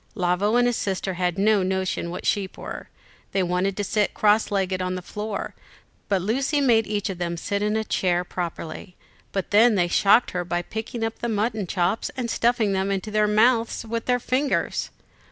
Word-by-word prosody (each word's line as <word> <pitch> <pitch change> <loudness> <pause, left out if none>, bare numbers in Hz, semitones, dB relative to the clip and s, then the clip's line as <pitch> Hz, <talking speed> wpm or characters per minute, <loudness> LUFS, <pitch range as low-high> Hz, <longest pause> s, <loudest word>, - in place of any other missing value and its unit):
Lavo 185 +3 +1
and 245 0 +4
his 245 -1 +1
sister 190 -1 -2
had 180 0 -1
no 210 +1 +3
notion 185 -2 -1
what 180 - -6
sheep 195 -3 -1
were. - - -7 0.4
They 195 - +2
wanted 180 +2 0
to 205 - -1
sit 210 +1 0
cross 210 +1 +3
legged 190 -2 0
on 185 0 -2
the 185 - -6
floor, 210 +2 -5 0.6
but 195 -3 +1
Lucy 270 +8 +1
made 235 -5 +3
each 205 -1 -1
of 180 - -8
them 170 -1 -2
sit 200 +4 -2
in 210 +1 0
a 220 - 0
chair 180 -4 0
properly; 175 0 -6 0.4
but 195 -2 -3
then 220 +2 +6
they 175 -2 +2
shocked 200 +6 +4
her 180 -1 -2
by 175 0 -2
picking 225 +4 -5
up 225 0 -3
the 235 - -2
mutton 215 -2 -1
chops 180 +4 0
and 240 -3 -2
stuffing 230 -4 +2
them 190 +1 0
into 195 +2 -2
their 210 0 +3
mouths 230 +2 +2
with 230 0 -3
their 250 0 +3
fingers. 265 +3 0
205 Hz, 195 wpm, -24 LUFS, 185-225 Hz, 0.6 s, then